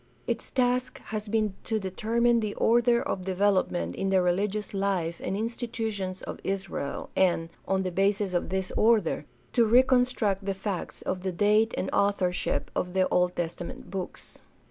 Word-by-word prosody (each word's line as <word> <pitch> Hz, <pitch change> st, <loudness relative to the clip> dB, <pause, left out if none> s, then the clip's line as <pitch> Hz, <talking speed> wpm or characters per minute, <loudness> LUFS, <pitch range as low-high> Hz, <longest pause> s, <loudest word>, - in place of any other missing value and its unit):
Its -, -, -2 dB
task 250 Hz, 0 st, +1 dB, 0.2 s
has 215 Hz, 0 st, -3 dB
been 215 Hz, -1 st, +1 dB
to 220 Hz, -, -1 dB
determine 230 Hz, +5 st, +1 dB
the 215 Hz, -2 st, -3 dB
order 235 Hz, +1 st, +3 dB
of 190 Hz, -, -2 dB
develop 190 Hz, +1 st, +2 dB
ment 85 Hz, 0 st, -3 dB
in 195 Hz, -, -1 dB
the 190 Hz, -1 st, +4 dB
religious 195 Hz, +4 st, 0 dB
life 190 Hz, -4 st, -1 dB
and 195 Hz, -, -1 dB
institutions 220 Hz, -4 st, -3 dB
of -, -, -6 dB
Israel, 190 Hz, -7 st, -3 dB
and, 170 Hz, -3 st, +2 dB, 0.2 s
on 190 Hz, 0 st, +1 dB
the'basis 195 Hz, +1 st, +1 dB
of 175 Hz, -, 0 dB
this 190 Hz, 0 st, -2 dB
order, 215 Hz, -9 st, +3 dB, 0.3 s
to 240 Hz, -, +5 dB
reconstruct 245 Hz, -4 st, +3 dB
the 195 Hz, 0 st, -2 dB
facts 195 Hz, -1 st, -4 dB
of 185 Hz, -1 st, -2 dB
the 190 Hz, 0 st, -2 dB
date 210 Hz, +4 st, +3 dB
and -, -, -1 dB
authorship 195 Hz, -3 st, +1 dB
of 180 Hz, +1 st, -2 dB
Old 180 Hz, 0 st, +2 dB
Testament 170 Hz, 0 st, -5 dB
books. 190 Hz, -2 st, -6 dB
195 Hz, 155 wpm, -28 LUFS, 185-220 Hz, 0.3 s, to